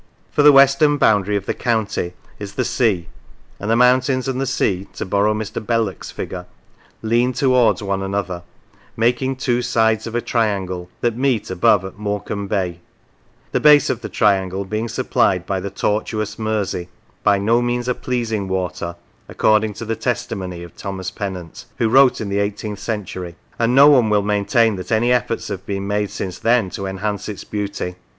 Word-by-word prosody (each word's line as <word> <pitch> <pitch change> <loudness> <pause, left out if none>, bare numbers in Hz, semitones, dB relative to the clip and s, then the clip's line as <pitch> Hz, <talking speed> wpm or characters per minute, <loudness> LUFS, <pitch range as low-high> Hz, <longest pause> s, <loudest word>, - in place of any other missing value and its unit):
For - - +2
the 150 0 +8
western 140 +2 +5
boundary 105 -5 +3
of 100 -1 -2
the - - -1
county 110 -6 -1 0.3
is 100 -1 -7
the 130 - 0
sea, 110 -8 +1 0.5
and 100 - -4
the 115 - +4
mountains 125 +2 +3
and 130 0 -1
the 135 - -1
sea 95 -6 0
(to - - -5
borrow 100 +3 +1
Mr. 110 0 -4
Belloc's 115 -4 -1
figure) - - -6 0.3
" - - -32
lean 125 +2 +3
towards 125 -6 +3
one 100 -1 -1
another, 95 -2 -3 0.6
making 125 +3 +1
two 125 -2 0
sides 110 -2 +1
of 115 - -6
a - - +2
triangle, 95 -7 -1
that 120 -2 +1
meet 125 -6 0
above 95 +1 +3
at 95 +2 -9
Morecambe 100 -1 -3
Bay," 90 -4 -2 0.7
the - - +1
base 150 -2 +6
of 120 - -4
the - - -6
triangle 95 -2 +1
being 110 +4 -2
supplied 90 -4 +1
by 95 -1 -1
the 100 +2 -4
tortuous 110 +1 -2
Mersey, 105 -5 -2 0.2
" - - -36
by 100 -1 +4
no 115 +5 +2
means 120 0 -1
a 125 - +2
pleasing 115 -6 -2
water," 90 -2 -3 0.3
according 110 0 +2
to 115 - -6
the 115 +1 -2
testimony 100 -6 -3
of 85 - -12
Thomas 95 -2 -5
Pennant, 95 -5 -6
who 115 - +2
wrote 130 +3 +5
in 105 - -4
the 100 +1 0
eighteenth 105 0 -3
century; 100 -5 -5 0.2
and 115 +2 +2
no 140 +1 +8
one 130 -7 +6
will 105 -1 +2
maintain 105 +1 +2
that 90 - -7
any 115 +2 +2
efforts 125 -1 0
have - - -5
been 100 -1 -3
made 105 0 -1
since 90 -2 -5
then 115 -5 +2
to 100 - -4
enhance 100 +2 -3
its 105 - -6
beauty. 100 -3 -4
105 Hz, 185 wpm, -20 LUFS, 95-120 Hz, 0.7 s, the